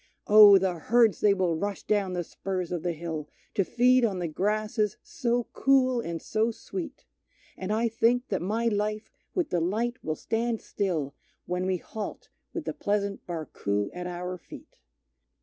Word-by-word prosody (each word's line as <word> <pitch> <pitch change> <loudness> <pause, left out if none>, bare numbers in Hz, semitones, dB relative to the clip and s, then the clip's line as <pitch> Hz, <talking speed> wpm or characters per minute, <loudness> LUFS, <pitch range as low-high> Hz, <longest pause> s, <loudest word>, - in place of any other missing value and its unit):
Oh! 210 -1 +9
the 185 -3 0
herds 230 +3 +3
they 205 -1 +4
will 180 -3 +1
rush 200 +4 -3
down 200 -3 0
the 175 -1 -1
spurs 185 0 -4
of 175 -2 -2
the 175 0 -1
hill 160 -2 -5 0.2
To 195 - +2
feed 250 +5 +4
on 205 -5 +1
the 175 -1 -2
grasses 210 +4 0
so 240 0 -1
cool 260 -2 +3
and 170 -5 -4
so 220 +6 0
sweet; 295 - -7 0.5
And 190 +2 -4
I 225 +2 +2
think 230 +2 +1
that 195 - -1
my 215 +6 -1
life 210 0 -1 0.2
with 355 -5 0
delight 215 +9 -1
will 155 - -1
stand 230 +5 -1
still 165 -9 -2 0.3
When 180 +1 -2
we 185 -1 +1
halt 210 +4 -7 0.2
with - - -5
the - - -2
pleasant 200 -1 -2
Barcoo 105 - -2
at 180 0 -5
our 180 +1 -5
feet. - - -13
200 Hz, 165 wpm, -28 LUFS, 180-225 Hz, 0.5 s, Oh